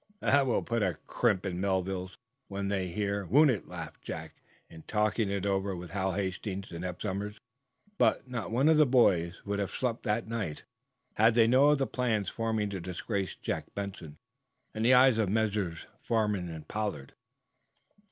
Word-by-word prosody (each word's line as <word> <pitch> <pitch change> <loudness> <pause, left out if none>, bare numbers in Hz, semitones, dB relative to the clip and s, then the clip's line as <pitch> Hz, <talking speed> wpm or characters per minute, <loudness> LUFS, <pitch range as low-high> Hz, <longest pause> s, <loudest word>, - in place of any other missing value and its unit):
"That 140 0 +3
will 120 - +1
put 115 -2 -1
a 95 -5 0
crimp 105 -6 +1
in 90 -2 -2
the - - -3
Melvilles, 95 -1 -1 0.3
when 100 0 -3
they 95 -2 -1
hear, 100 +2 -2
won't 145 - +6
it?" 110 - -3
laughed - - -8
Jack, - - -7 0.3
in 80 -1 -12
talking 105 0 +1
it 100 -1 -2
over 95 -1 0
with 90 -2 -8
Hal 95 0 -1
Hastings 95 +1 -3
and 85 +1 -6
Eph 90 -1 -5
Somers. 105 +1 -3 0.9
Not 125 -4 -4
one 130 +6 +3
of 160 -1 +6
the 150 -2 +6
boys 90 -9 +3
would 100 0 -2
have 100 - -1
slept 125 -2 -2
that 110 0 -1
night, 110 -9 -4 0.5
had 110 +1 +5
they 115 -1 +6
known 135 +5 +5
of - - +1
the 135 - +1
plans 115 -6 -1
forming 110 -2 -1
to 95 - -4
disgrace 95 +3 -3
Jack - - -5
Benson 95 -7 -6 0.5
even - - -11
in - - -2
the 125 +2 +7
eyes 125 -2 +6
of 105 -4 +1
Messrs. 105 -5 -1 0.2
Farnum 105 -6 0
and 80 -2 -8
Pollard. 105 -11 -4
100 Hz, 180 wpm, -30 LUFS, 95-115 Hz, 0.9 s, the